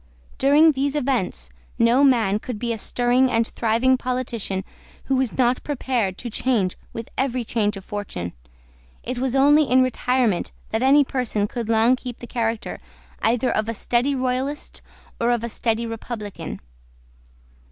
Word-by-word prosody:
During 295 +4 +6
these 280 +1 -1
events 245 - -1 0.3
no 235 +4 +4
man 225 -7 +3
could 245 0 -6
be 235 +2 -2
a - - -4
stirring 245 +4 +2
and 230 -1 +2
thriving 235 +3 +2
politician 240 -7 -2 0.4
who 270 - 0
was 260 -2 -1
not 250 -1 +2
prepared 245 -9 -1
to 240 - -6
change 210 -7 0 0.2
with 230 0 -7
every 255 -2 0
change 210 -3 -1
of 195 - -10
fortune. 205 - -5 0.7
It 250 0 -4
was 260 0 -1
only 290 +3 +5
in 255 0 +4
retirement 250 -5 0 0.2
that 220 - 0
any 280 +3 +6
person 245 -6 -1
could 230 0 -5
long 230 +3 +4
keep 250 -2 -7
the - - -9
character 230 -2 -2 0.4
either 235 +3 +2
of 215 +1 -1
a 230 - -2
steady 245 +6 +1
Royalist 260 +3 -2 0.4
or 235 - +1
of 240 -2 +1
a 235 - -2
steady 230 +1 -1
Republican. 225 -2 -6
240 Hz, 155 wpm, -23 LUFS, 225-260 Hz, 0.7 s, During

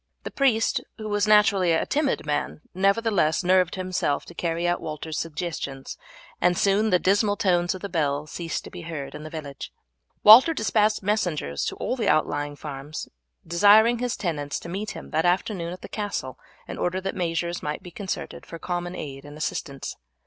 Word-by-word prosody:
The - - -6
priest, 240 -5 +2 0.2
who 215 - -6
was 205 0 +1
naturally 200 -4 +5
a 160 - +1
timid 285 - 0
man, 150 0 -2
nevertheless 195 -3 +2
nerved 180 -1 +3
himself 185 -6 -1
to - - -11
carry 170 0 -1
out 175 0 0
Walter's 155 0 -4
suggestions, 150 -4 -5 0.5
and 180 0 +3
soon 205 +2 +3
the 180 - +5
dismal 205 +3 +2
tones 175 -3 +1
of 185 - -9
the 200 - -3
bell 150 -5 0
ceased 165 +2 -4
to - - -11
be 180 - -8
heard 160 -5 -6
in - - -8
the 155 - -7
village. 150 -3 -7 0.5
Walter 250 +10 +9
despatched 215 -2 +2
messengers 175 - -1
to - - -3
all - - -2
the 240 - 0
outlying 145 -1 +1
farms 145 0 -7 0.4
desiring 210 +7 +5
his 245 -1 -2
tenants 145 -6 -2
to 170 - -8
meet 200 +4 -4
him - - -10
that 160 - +1
afternoon 175 -1 0
at 180 - -8
the - - -6
castle 170 - -4 0.3
in - - -6
order 180 +1 0
that 195 +1 -3
measures 170 -1 -2
might 150 +4 -4
be 180 - -10
concerted 190 +2 -5
for 165 - -9
common 175 +1 -4
aid 135 -2 -7
and 145 +1 -11
assistance. 140 -2 -4
175 Hz, 185 wpm, -25 LUFS, 155-205 Hz, 0.5 s, Walter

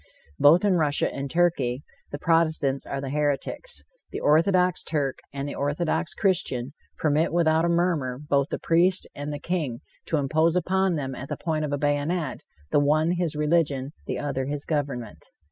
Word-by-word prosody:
Both 165 +7 +6
in 190 -3 +3
Russia 150 -3 +1
and 140 0 -4
Turkey, 145 -6 +1 0.3
the 145 - -5
protestants 155 -4 +1
are - - -3
the 135 -1 -4
heretics. 150 - -2 0.3
The - - -5
orthodox 180 +4 +3
Turk 140 -4 -1
and 140 0 -4
the 145 - -4
orthodox 145 - -1
Christian 140 -9 0 0.2
permit 155 +1 +1
without 165 -1 +3
a - - +1
murmur 170 -7 +1
both 140 0 0
the - - -2
priest 180 +3 +2
and 145 +1 -5
the 145 - -3
king 145 -7 -3 0.3
to 160 - +1
impose 160 +4 +2
upon 185 +1 +1
them 135 -3 -3
at 135 +2 -8
the - - -3
point 155 -2 -1
of 145 - -4
a 145 - 0
bayonet, 145 +4 -1 0.3
the - - +4
one 155 +3 +2
his 175 -3 -1
religion, 150 -2 +2
and 135 +3 -7
the - - -2
other 135 -2 -2
his 145 +1 -4
government. 135 -8 -3
150 Hz, 180 wpm, -25 LUFS, 140-170 Hz, 0.3 s, Both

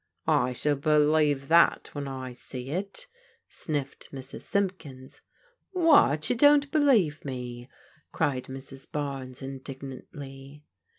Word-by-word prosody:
" - - -52
I 125 +1 +2
shall 145 +3 0
believe 150 -1 +3
that 170 +1 +4
when 145 -1 -4
I 130 -2 -6
see 125 +1 -7
it," 195 - -4 0.4
sniflFed 145 -4 -4
Mrs. 135 -1 -7
Simp 195 -2 0
kins. 130 -4 -12 0.3
" - - -44
What, 300 - +5
you - - +1
don't 290 +2 +5
believe 235 - +3
me? 125 -2 -6 0.2
" - - -33
cried 130 -3 0
Mrs. 135 0 -9
Barnes 135 -3 -4
in 135 0 -6
dignantly. 135 +1 -9
140 Hz, 135 wpm, -28 LUFS, 130-165 Hz, 0.4 s, What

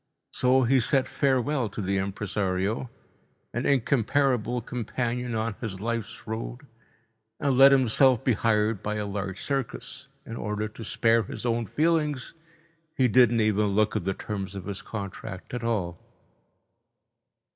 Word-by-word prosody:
So 130 +1 +3
he 130 +2 +4
said 135 +2 +2
farewell 135 -2 +1
to 100 - -8
the 100 -1 0
impresario, 100 +3 -2 0.6
an 120 +2 -1
incomparable 125 -2 +2
companion 120 +1 -3
on 110 0 -1
his 100 -6 -4
life's 115 +1 -4
road, 115 +4 -5 0.7
and 140 -2 +1
let 135 +2 +8
himself 130 -1 +4
be 125 - +3
hired 105 -1 +1
by 105 0 -2
a 105 -1 -2
large 100 -1 -4
circus. 135 0 -4 0.2
In 115 - -7
order 105 0 -2
to 110 +2 -10
spare 115 +1 +2
his 110 - -6
own 115 -1 0
feelings, 150 - 0 0.6
he 130 - +4
didn't 120 0 +5
even 105 -1 +2
look 110 +1 +2
at 105 - 0
the 95 +1 -1
terms 100 -2 -5
of 95 - -6
his 100 -1 -5
contract 100 -1 -7
at 125 -1 -3
all. 95 -7 -1
115 Hz, 145 wpm, -27 LUFS, 105-130 Hz, 0.7 s, let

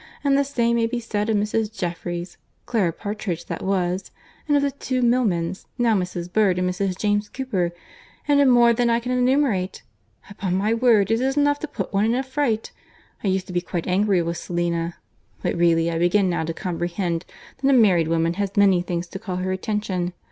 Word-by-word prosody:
And 280 -1 +3
the 280 - +3
same 235 -4 +1
may 230 -1 +2
be 240 +1 -2
said 210 -2 -2
of 220 - +2
Mrs. 210 +1 0
Jeffereys—Clara 175 +3 -3
Partridge, 200 -2 -4
that - - -5
was—and 190 - -2
of 280 - +1
the 280 - +1
two 255 -2 -2
Milmans, 195 -8 +1
now 235 -3 +3
Mrs. 180 -2 -3
Bird 200 -4 +3
and 180 0 +1
Mrs. 180 0 -1
James 205 0 0
Cooper; 200 -10 -2 0.6
and 285 -1 +4
of 280 - +5
more 240 -2 +6
than 240 +1 +1
I 230 0 +3
can 245 +1 -4
enumerate. 250 -7 +1 0.4
Upon 195 -2 -3
my 205 +4 +1
word 225 -3 +3
it 225 +2 +2
is 270 +2 0
enough 290 0 +3
to 310 - -4
put - - -5
one 200 +2 +2
in 230 +2 +2
a 260 - 0
fright. 260 -5 -1 0.5
I - - 0
used 190 -1 0
to 180 - -9
be 175 - +1
quite 175 -1 -4
angry 190 -1 +2
with 170 +1 -3
Selina; 170 -1 -2 0.5
but - - 0
really 170 -1 +3
I 165 - -2
begin 180 +2 +3
now 165 -2 -1
to 165 - -2
comprehend 175 -1 -2 0.4
that 275 - +3
a - - +5
married 195 - +4
woman 165 0 +1
has 200 0 -3
many 195 -3 +5
things 175 -1 -3
to 195 - -7
call 190 -3 -5
her 185 +1 -2
attention. 185 -3 -2
200 Hz, 200 wpm, -23 LUFS, 175-235 Hz, 0.6 s, more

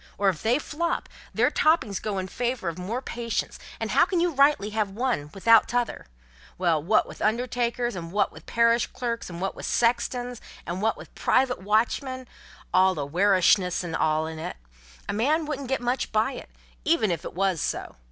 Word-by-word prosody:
Or, 200 0 +3
if 175 -5 -3
they 235 +3 +3
flop, 335 +3 -2 0.2
their - - +2
floppings 310 - +2
goes 205 -3 -3
in 185 - -5
favour 240 -3 -2
of 170 - -7
more 225 +8 -3
patients, 235 -2 -3 0.2
and - - -3
how - - +5
can 360 - 0
you 350 0 +2
rightly 275 -6 +3
have 215 -2 0
one 210 - -2
without 225 +3 +5
t'other? 245 - -2 0.5
Then, 165 -3 +1
wot 215 - +3
with - - -11
undertakers, 240 +1 0
and 165 -2 -6
wot 205 +2 +1
with - - -14
parish 235 0 +3
clerks, 235 -4 -4
and 170 -1 -7
wot 195 +1 -2
with - - -7
sextons, 245 0 0 0.2
and 175 +2 -4
wot 225 +1 +1
with - - -12
private 255 -4 +1
watchmen 245 +5 0 0.5
(all 185 0 +5
awaricious 180 +4 +2
and 165 -2 -4
all 155 0 +1
in 160 0 -6
it), 160 - -5 0.5
a - - -2
man 295 +10 +1
wouldn't 280 -3 -4
get 265 -2 0
much 245 +1 -1
by 220 +4 +2
it, - - -9 0.3
even 300 - +2
if 170 - -3
it - - -7
wos 190 -4 +1
so. - - -3
220 Hz, 190 wpm, -26 LUFS, 185-250 Hz, 0.5 s, how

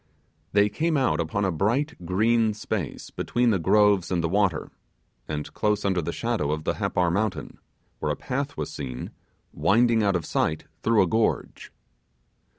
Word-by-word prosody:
They 100 0 +4
came 155 +9 0
out 130 - +1
upon 85 +5 -1
a 95 - +1
bright 110 - -1
green 110 +3 +2
space 105 - -4
between 120 -1 +1
the 95 - +1
groves 100 +1 +3
and 90 -3 0
the - - +2
water, 95 -2 0 0.6
and 75 -1 -5
close 105 -1 0
under 95 -3 +1
the 85 +2 -3
shadow 115 -8 -1
of 75 0 -2
the - - 0
Happar 90 -1 0
mountain, 105 0 -2 0.4
where 75 - -1
a - - -1
path 140 - -4
was 75 - -3
seen 65 -3 -6 0.4
winding 115 +1 +3
out 100 -2 +2
of 85 -3 -1
sight 80 0 0 0.2
through 110 -3 +4
a - - 0
gorge. 110 +5 -1
100 Hz, 165 wpm, -25 LUFS, 85-115 Hz, 0.6 s, They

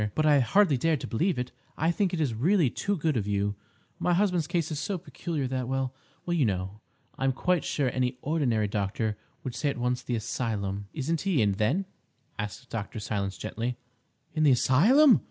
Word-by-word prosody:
"But 155 - +2
I 145 -2 +6
hardly 160 - +4
dared 160 +3 +1
to - - -4
believe 165 - 0
it. 125 0 -3 0.3
I 160 +2 +2
think 185 +1 +1
it 175 - -2
is 140 -7 +1
really 155 - +3
too 200 +7 -1
good 155 -2 0
of 105 -4 -1
you. 100 0 0 0.5
My 175 - +2
husband's 180 -5 +2
case 170 -2 -1
is 150 - -2
so 190 +7 -2
peculiar 165 -4 -4
that—well, 130 0 -2 0.3
you 175 -4 +2
know, 95 -1 -2 0.4
I - - -2
am 135 - +4
quite 180 +4 +1
sure 140 -3 0
any 125 0 0
ordinary 130 -9 +1
doctor 105 +2 -1 0.3
would 130 - -4
say 145 - 0
at 140 - -3
once 125 0 0
the 120 - -2
asylum—" 100 -3 -2
"Isn't 160 +2 -1
he 190 -7 +1
in, 105 -3 +4
then?" 120 - +1 0.5
asked 105 +5 -5
Dr. 110 0 -4
Silence 100 -2 -2
gently. 115 +3 -3 0.6
"In 155 - -1
the 150 - +6
asylum?" 225 - +6
130 Hz, 190 wpm, -28 LUFS, 110-165 Hz, 0.6 s, I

